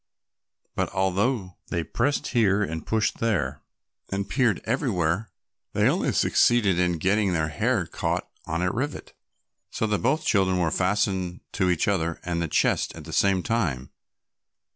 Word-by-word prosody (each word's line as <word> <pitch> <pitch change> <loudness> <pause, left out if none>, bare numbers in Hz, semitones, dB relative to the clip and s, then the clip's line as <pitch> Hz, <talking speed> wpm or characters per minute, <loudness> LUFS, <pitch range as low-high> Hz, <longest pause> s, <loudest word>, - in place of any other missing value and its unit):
But - - -1
although 95 +1 0
they 85 - -2
pressed 120 - -1
here 105 -4 +3
and 80 -4 -5
pushed 110 -1 0
there 75 -12 0 0.5
and 100 0 -2
peered 115 -1 +2
everywhere, 105 - 0 0.4
they - - +3
only - - +1
succeeded 105 -7 +3
in 90 -1 +1
getting 100 +3 +1
their 80 -2 0
hair 110 +3 0
caught 80 - -2 0.2
on 80 +2 -1
a 90 - +1
rivet, 140 +8 -4 0.6
so - - -2
that 105 -2 0
both 145 +6 +1
children 95 -2 +2
were 85 -3 +1
fastened 95 -2 0
to 95 -2 +1
each 90 -3 +1
other 85 -5 0
and 90 -1 -2
to 85 - -1
the - - -17
chest - - +1
at - - -9
the - - -9
same 95 -2 +2
time. 80 - -1
95 Hz, 160 wpm, -25 LUFS, 85-110 Hz, 0.6 s, here